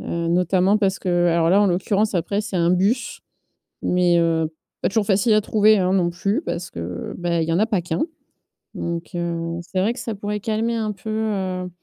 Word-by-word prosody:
Heu, 170 0 -3
notamment 180 +3 +3
parce 195 -2 +1
que 175 -1 +1
alors 165 0 +2
là, 200 +3 +5
en - - +4
l'occurrence, 195 +3 +1
après, 195 +4 0
c'est 205 -3 -4
un 170 0 +2
bus, 205 +8 0 0.6
mais, 180 -1 +3
heu, 165 -1 +1 0.3
pas - - +2
toujours 205 0 +1
facile 205 +2 +3
à 215 - +5
trouver, 215 0 +4
hein, 185 0 +1
non 175 -2 +2
plus, 195 +4 -1
parce 170 0 -4
que, - - -10
heu, 85 +1 -5
bah, 170 -1 0
il 160 - -3
y - - +1
en - - +2
a 215 - +4
pas 210 -5 0
qu'un. 165 0 -2 0.7
Donc, 170 0 -4
heu, 170 -1 -3
c'est 185 +1 -2
vrai 215 - +2
que - - -9
ça 225 - -4
pourrait 210 +1 -3
calmer 225 +1 -1
un 215 -1 -1
peu, 220 +2 -9
heu 190 -4 -2
185 Hz, 220 wpm, -22 LUFS, 170-210 Hz, 0.7 s, là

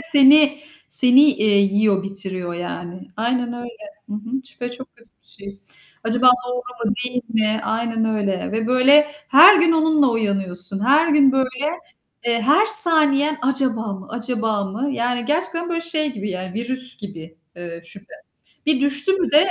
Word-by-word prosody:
Seni 295 -1 +4 0.3
seni, 255 +2 +6
eee, 215 -8 +2
yiyor, 200 0 0
bitiriyor 190 -2 -2
yani. 175 +1 -9
Aynen 240 +2 -3
öyle. 240 +4 -10 0.2
Hı 210 - -7
hı. 235 +5 -6
Şüphe 245 -2 -8
çok 260 0 -11
kötü 235 -2 -20
bir - - -28
şey. 200 -1 -13 0.4
Acaba 245 +3 +3 0.2
doğru 250 - -4 0.3
mu, - - 0
değil 250 0 -3
mi? 220 -1 -1
Aynen 225 0 -3
öyle. 205 -4 -3
Ve, 225 +1 -3
böyle, 265 +4 +4 0.2
her 345 +9 +7
gün 335 -1 +2
onunla 315 -3 +1
uyanıyorsun. 195 -3 -2
Her 295 +6 +2
gün, 290 -3 +3
böyle, 265 +1 -3 0.6
eee, 235 -1 -1
her 295 - +2
saniyen 310 -8 +6
acaba 255 -5 -2
mı, 190 -1 -11
acaba 225 -3 -4
mı? 215 +8 -5
Yani 245 -1 -3
gerçekten 335 +4 -3
böyle 335 -1 -3
şey 310 -4 -3
gibi, 210 -2 -7
yani, 185 0 -8
virüs 255 +3 -1
gibi, 165 -6 -12 0.2
ııı, 170 -1 -10
şüphe. 195 +4 -14 0.5
Bir 295 -3 +1
düştü 285 +6 -1
mü 365 -4 -2
de, 295 - +5
240 Hz, 160 wpm, -19 LUFS, 205-285 Hz, 0.6 s, her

